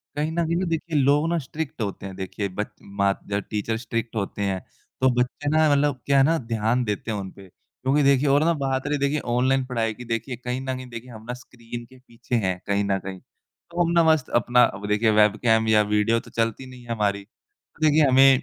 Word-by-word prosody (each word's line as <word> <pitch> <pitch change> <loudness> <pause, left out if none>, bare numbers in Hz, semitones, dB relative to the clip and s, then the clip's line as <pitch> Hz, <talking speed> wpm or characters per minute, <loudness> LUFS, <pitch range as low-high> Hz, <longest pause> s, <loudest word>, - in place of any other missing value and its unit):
कहीं 150 +2 -1
न 170 +1 0
कहीं 165 +1 0
ना 185 +2 0
देखिए 165 -1 -1
लोग 145 +3 +3
ना 170 - +1
स्ट्रिक्ट 150 -1 -6
होते 100 -2 -4
हैं, 95 -1 -7
देखिए 95 +2 -4
बच 105 +3 -3 0.2
माँ 100 0 0 0.2
या 100 - +1
टीचर 105 +2 -3
स्ट्रिक्ट 115 0 -4
होते 100 -1 -3
हैं 95 -2 0 0.4
तो 130 - +5
बच्चे 130 +4 -1
ना 155 0 +4
मतलब 145 -2 +2
क्या 140 -1 +3
है 135 - +6
ना 165 +4 +3 0.2
ध्यान 115 +3 +1
देते 105 0 -3
हैं 105 - -2
उन 95 -1 -5
पे 100 -1 -14
क्योंकि 135 +9 -2
देखिए 140 +1 +4
और 145 +2 +4
ना 170 +1 +3
बात 135 +1 -1
रही 145 0 0
देखिए 140 +2 0 0.2
ऑनलाइन 130 +1 +2
पढ़ाई 115 -3 -1
की, 125 +3 -10
देखिए 115 +2 -3
कहीं 125 +1 -4
न 130 -1 -3
कहीं 130 0 -8
देखिए 120 +1 -9
हम 110 -2 -11
ना 125 - -3
स्क्रीन 120 -1 -9
के 130 +2 -18
पीछे 120 0 -6
हैं 95 -5 0
कहीं 100 0 +1
न 100 -1 +1
कहीं, 95 0 -7
तो 170 - -6
हम 170 - 0
ना 170 -1 +4
मस्त 160 -4 +3
अपना 120 +2 +4
अब 105 -1 -1
देखिए 105 +2 +2
वेबकैम 110 +1 +3
या 110 -1 +5
वीडियो 110 +2 +3
तो - - -15
चलती 115 +3 -1
नहीं 125 -1 -12
है 120 - -8
हमारी, 100 -3 0 0.6
देखिए 155 -1 +5
हमें 135 0 +6
125 Hz, 230 wpm, -24 LUFS, 105-140 Hz, 0.6 s, है